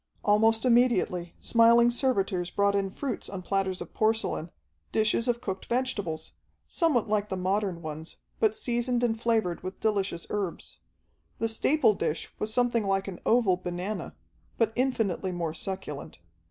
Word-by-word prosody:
Almost 220 +3 +4
immediately 235 -8 +2
smiling 235 +1 +5
servitors 195 -9 0
brought 200 +1 +2
in 200 -1 0
fruits 255 +4 -4
on 190 -2 -6
platters 195 -1 -1
of - - -8
porcelain, 220 -6 0 0.4
dishes 220 +2 +1
of 240 -1 0
cooked 195 -6 -5
vegetables, 205 -11 -2 0.3
somewhat 295 - +1
like 210 0 0
the 190 - -2
modern 185 -1 -1
ones, 155 +1 -7 0.2
but 220 -1 +3
seasoned 240 +1 0
and 225 -2 0
flavored 220 -7 +1
with 185 +1 -7
delicious 200 -5 -1
herbs. 200 -5 -4 0.6
The 225 - 0
staple 225 +1 +3
dish 160 -4 -3
was 215 - -2
something 235 -2 +1
like 195 0 0
an 190 -3 -6
oval 225 -6 +4
banana, 180 +4 -4 0.4
but 225 -1 +2
infinitely 225 -8 0
more 170 -3 -3
succulent. 165 - -6
210 Hz, 145 wpm, -28 LUFS, 185-235 Hz, 0.6 s, smiling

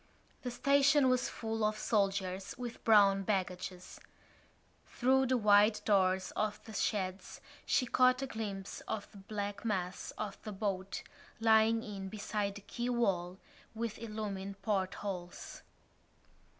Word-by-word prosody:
The 250 - -3
station 280 +2 +4
was 255 0 +2
full 225 -1 -3
of 215 0 +1
soldiers 195 -3 0
with 240 -1 -6
brown 200 -3 +6
baggages. 185 -2 -3 0.9
Through 265 +1 +2
the 255 0 +2
wide 210 0 +5
doors 190 -2 +2
of 215 -1 -1
the 220 - -10
sheds 190 -2 -2 0.3
she 255 - +3
caught 255 +1 +3
a - - 0
glimpse 205 -6 -5
of 205 - -4
the 200 - -13
black 205 0 -5
mass 185 -5 -2
of 210 -2 -5
the 215 - -6
boat, 195 -1 -3 0.4
lying 225 0 +4
in 195 -2 -6
beside 205 -1 -2
the 205 - -8
quay 240 +5 -4
wall, 190 -7 0 0.4
with 225 -1 -3
illumined 205 -3 -5
portholes. 190 -3 -3
210 Hz, 130 wpm, -33 LUFS, 195-225 Hz, 0.9 s, brown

